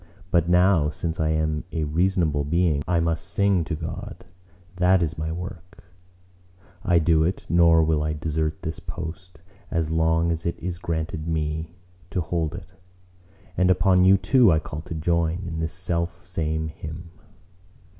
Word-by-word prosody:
But 85 Hz, -1 st, +2 dB
now, 90 Hz, -3 st, +4 dB
since 80 Hz, +2 st, -4 dB
I 80 Hz, -1 st, +1 dB
am 80 Hz, -1 st, 0 dB
a 80 Hz, -, -2 dB
reasonable 80 Hz, -1 st, +1 dB
being, 80 Hz, -1 st, +1 dB
I 85 Hz, -1 st, +2 dB
must 85 Hz, 0 st, 0 dB
sing 95 Hz, 0 st, +1 dB
to 80 Hz, -, -3 dB
God: 95 Hz, +6 st, -7 dB, 0.5 s
that 90 Hz, 0 st, +4 dB
is 80 Hz, 0 st, -2 dB
my 80 Hz, 0 st, -3 dB
work: 90 Hz, +1 st, -8 dB, 1.0 s
I 85 Hz, -1 st, +3 dB
do 80 Hz, -1 st, +3 dB
it, 90 Hz, +4 st, -2 dB
nor 85 Hz, -1 st, +5 dB
will 80 Hz, -1 st, +1 dB
I 75 Hz, 0 st, -1 dB
desert 80 Hz, 0 st, -2 dB
this 80 Hz, -, -5 dB
my -, -, -3 dB
post, 85 Hz, +1 st, -8 dB, 0.3 s
as 80 Hz, -1 st, -1 dB
long 80 Hz, +1 st, +2 dB
as 80 Hz, 0 st, -2 dB
it 85 Hz, -, -2 dB
is 85 Hz, 0 st, -5 dB
granted 80 Hz, -2 st, -3 dB
me 80 Hz, +1 st, -2 dB, 0.3 s
to 95 Hz, -, -2 dB
hold 80 Hz, -1 st, -2 dB
it; 90 Hz, 0 st, -10 dB, 0.8 s
and 90 Hz, 0 st, +3 dB
upon 95 Hz, 0 st, +4 dB
you 95 Hz, +1 st, +6 dB
too 120 Hz, 0 st, +4 dB
I 80 Hz, -, +4 dB
call 75 Hz, -1 st, -5 dB
to 85 Hz, 0 st, -7 dB
join 85 Hz, +2 st, 0 dB
in 80 Hz, -2 st, -4 dB
this 80 Hz, 0 st, -2 dB
self 85 Hz, -1 st, -2 dB
same 80 Hz, -2 st, -2 dB
hymn. 80 Hz, +2 st, -9 dB
85 Hz, 165 wpm, -24 LUFS, 80-90 Hz, 1.0 s, you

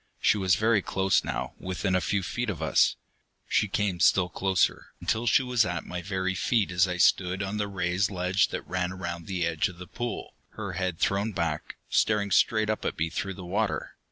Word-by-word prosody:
She -, -, +4 dB
was 95 Hz, -2 st, +3 dB
very 110 Hz, -1 st, +3 dB
close 95 Hz, 0 st, +1 dB
now, -, -, -3 dB
within 95 Hz, +1 st, -2 dB
a 95 Hz, -, +3 dB
few 100 Hz, 0 st, 0 dB
feet 120 Hz, +6 st, -2 dB
of 90 Hz, -7 st, -3 dB
us. 80 Hz, -2 st, +3 dB, 0.5 s
She 105 Hz, -, +2 dB
came 100 Hz, -2 st, -1 dB
still 90 Hz, 0 st, +4 dB
closer, 95 Hz, +1 st, 0 dB
until 115 Hz, +2 st, -1 dB
she 130 Hz, -, +4 dB
was 125 Hz, -2 st, +2 dB
at 90 Hz, -3 st, -3 dB
my 90 Hz, 0 st, -5 dB
very 95 Hz, 0 st, -1 dB
feet 100 Hz, +1 st, +1 dB
as 90 Hz, +1 st, +3 dB
I 90 Hz, -1 st, -3 dB
stood 90 Hz, +2 st, +3 dB
on 100 Hz, +2 st, -3 dB
the 105 Hz, -1 st, -1 dB
raised 95 Hz, 0 st, 0 dB
ledge 90 Hz, 0 st, +1 dB
that -, -, -5 dB
ran 90 Hz, -1 st, -1 dB
around 85 Hz, -3 st, -5 dB
the 90 Hz, -3 st, -1 dB
edge 80 Hz, -2 st, +1 dB
of 90 Hz, -, -12 dB
the 90 Hz, -, -8 dB
pool, 120 Hz, +5 st, -5 dB, 0.2 s
her 100 Hz, -3 st, -5 dB
head 90 Hz, -1 st, -2 dB
thrown 100 Hz, +5 st, 0 dB
back, 85 Hz, -4 st, -2 dB
staring 105 Hz, -2 st, +1 dB
straight 110 Hz, +3 st, +3 dB
up 110 Hz, 0 st, -1 dB
at -, -, -2 dB
me 80 Hz, +1 st, -1 dB
through 95 Hz, +3 st, -3 dB
the 90 Hz, -, -9 dB
water. 100 Hz, +4 st, -1 dB
95 Hz, 210 wpm, -27 LUFS, 90-105 Hz, 0.5 s, She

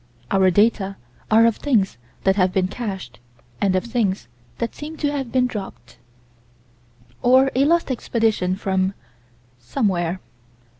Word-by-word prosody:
Our 190 Hz, -1 st, +4 dB
data 200 Hz, 0 st, +2 dB, 0.3 s
are 225 Hz, +1 st, +6 dB
of 230 Hz, -2 st, +2 dB
things 205 Hz, -, +1 dB, 0.2 s
that 190 Hz, 0 st, +3 dB
have 185 Hz, -2 st, +2 dB
been 185 Hz, 0 st, +1 dB
cached, 195 Hz, -, -6 dB, 0.4 s
and 195 Hz, -2 st, +2 dB
of 185 Hz, -, +1 dB
things 220 Hz, -, -1 dB, 0.3 s
that 230 Hz, -, -3 dB
seem 310 Hz, +2 st, -8 dB
to 290 Hz, -2 st, 0 dB
have 270 Hz, -5 st, -3 dB
been 255 Hz, -1 st, +3 dB
dropped 200 Hz, -, -7 dB, 1.2 s
Or 260 Hz, +2 st, +5 dB
a 270 Hz, +2 st, +3 dB
Lost 335 Hz, -2 st, +2 dB
Expedition 220 Hz, -6 st, 0 dB
from 190 Hz, 0 st, -1 dB, 0.6 s
Somewhere. 175 Hz, -, -1 dB
205 Hz, 135 wpm, -22 LUFS, 190-250 Hz, 1.2 s, are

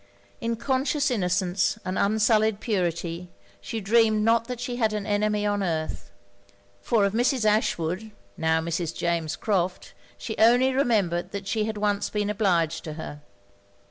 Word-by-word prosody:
In 230 Hz, 0 st, -1 dB
conscious 270 Hz, +3 st, 0 dB
innocence 185 Hz, -1 st, 0 dB
and 185 Hz, 0 st, -2 dB
unsullied 215 Hz, 0 st, +2 dB
purity, 175 Hz, -5 st, -2 dB, 0.3 s
she 225 Hz, -, -4 dB
dreamed 215 Hz, +1 st, +3 dB
not 230 Hz, +1 st, +3 dB
that 250 Hz, -2 st, -5 dB
she 245 Hz, 0 st, -4 dB
had 220 Hz, -3 st, +1 dB
an 210 Hz, -1 st, -3 dB
enemy 210 Hz, 0 st, 0 dB
on 205 Hz, -1 st, 0 dB
earth; 155 Hz, -, -3 dB, 0.7 s
for 215 Hz, -, +2 dB
of 200 Hz, -, -1 dB
Mrs. 245 Hz, 0 st, +1 dB
Ashwood, 210 Hz, -2 st, 0 dB, 0.3 s
now 160 Hz, 0 st, +1 dB
Mrs. 165 Hz, 0 st, -3 dB
James 170 Hz, -2 st, -1 dB
Crofts, 185 Hz, -4 st, -2 dB, 0.2 s
she 220 Hz, -, -5 dB
only 245 Hz, +4 st, +5 dB
remembered 210 Hz, -10 st, +1 dB
that 200 Hz, -1 st, -5 dB
she 215 Hz, +2 st, 0 dB
had 220 Hz, -1 st, -4 dB
once 205 Hz, -1 st, 0 dB
been 210 Hz, -1 st, -1 dB
obliged 175 Hz, -6 st, +1 dB
to 155 Hz, -, -5 dB
her. 150 Hz, -2 st, -8 dB
205 Hz, 150 wpm, -25 LUFS, 175-225 Hz, 0.7 s, only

